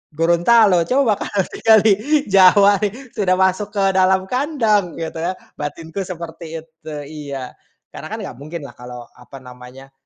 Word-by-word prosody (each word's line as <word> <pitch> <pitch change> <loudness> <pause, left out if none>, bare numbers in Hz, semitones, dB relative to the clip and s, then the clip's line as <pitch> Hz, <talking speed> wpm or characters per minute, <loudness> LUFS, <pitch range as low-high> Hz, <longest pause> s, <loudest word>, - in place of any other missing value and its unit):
Gorontalo. 175 +4 +4
Coba 255 -6 +1
kalau 200 -2 -1
tinggal 220 -1 +4
di 215 -2 +5 0.4
Jawa, 195 +1 +6
nih, 235 +5 -4
sudah 185 -3 +1
masuk 190 +2 +1
ke 200 - +1
dalam 190 0 +3
kandang," 230 - 0
gitu 165 0 -5
ya. 175 +3 -2 0.3
Batinku 160 +4 -6
seperti 165 -2 -7
itu 160 -1 -12
iya. 140 -4 -7 0.4
Karena - - -9
kan, - - -3
nggak - - -8
mungkinlah 150 0 -8
kalau, 125 -1 -10
apa 135 - -13
namanya, 125 +2 -13
175 Hz, 150 wpm, -19 LUFS, 155-205 Hz, 0.4 s, Jawa